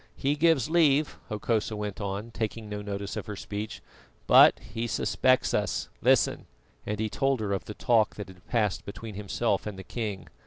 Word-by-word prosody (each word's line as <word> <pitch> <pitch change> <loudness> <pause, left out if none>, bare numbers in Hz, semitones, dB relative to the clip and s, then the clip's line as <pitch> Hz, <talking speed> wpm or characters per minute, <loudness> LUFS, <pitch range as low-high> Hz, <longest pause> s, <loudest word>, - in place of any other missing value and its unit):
"He 140 +2 0
gives 155 -4 +3
leave," 155 -3 +3
Hokosa 110 +1 -1
went 105 -1 -4
on, 100 +3 -4
taking 110 0 -4
no 105 0 -5
notice 100 -1 -4
of - - -5
her 105 - -5
speech, 105 +2 -6 0.4
"but - - +8
he 115 +2 -5
suspects 130 +2 +2
us. - - -1
Listen - - +3 0.2
" - - -35
and 105 0 -2
he 110 - 0
told 135 +4 0
her 105 -2 -1
of 95 - -3
the 105 - -7
talk 115 -3 +2
that 105 - -6
had 90 -1 -16
passed 105 -5 0
between 110 +2 -8
himself 105 +1 -1
and 105 -2 -6
the 95 - -7
king. 105 -2 -4
105 Hz, 190 wpm, -28 LUFS, 100-120 Hz, 0.4 s, but